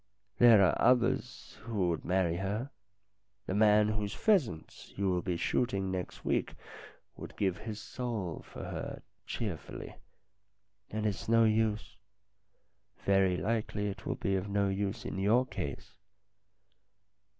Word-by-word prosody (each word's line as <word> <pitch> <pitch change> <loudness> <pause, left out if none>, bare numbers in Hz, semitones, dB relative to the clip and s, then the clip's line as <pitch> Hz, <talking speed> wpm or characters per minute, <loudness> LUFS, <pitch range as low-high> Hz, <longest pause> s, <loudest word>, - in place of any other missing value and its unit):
There 115 -4 +8
are - - +1
others 125 +1 +1
who 105 -6 -1
would 80 -3 -2
marry 90 -2 +1
her. 105 +8 -3 0.7
The - - -3
man 105 0 +5
whose 105 0 -2
pheasants 145 - 0
you 100 0 0
will 90 -1 0
be 90 -2 -2
shooting 95 -1 0
next 90 -1 -5
week - - 0 0.6
would - - -10
give 95 -3 0
his 110 -1 -6
soul 110 -10 -4
for - - -10
her - - -6 0.2
cheerfully, 100 -9 -5 1.0
and 110 0 -3
it's 105 +1 -2
no 115 0 +5
use. 110 -1 +1 1.1
Very 95 -2 +3
likely 105 +2 -1
it 100 - -7
will - - -1
be 95 - -1
of 95 +2 -2
no 100 0 +1
use 100 0 -2
in 95 - -4
your 110 +6 +3
case." 70 - -6
105 Hz, 135 wpm, -31 LUFS, 95-110 Hz, 1.1 s, There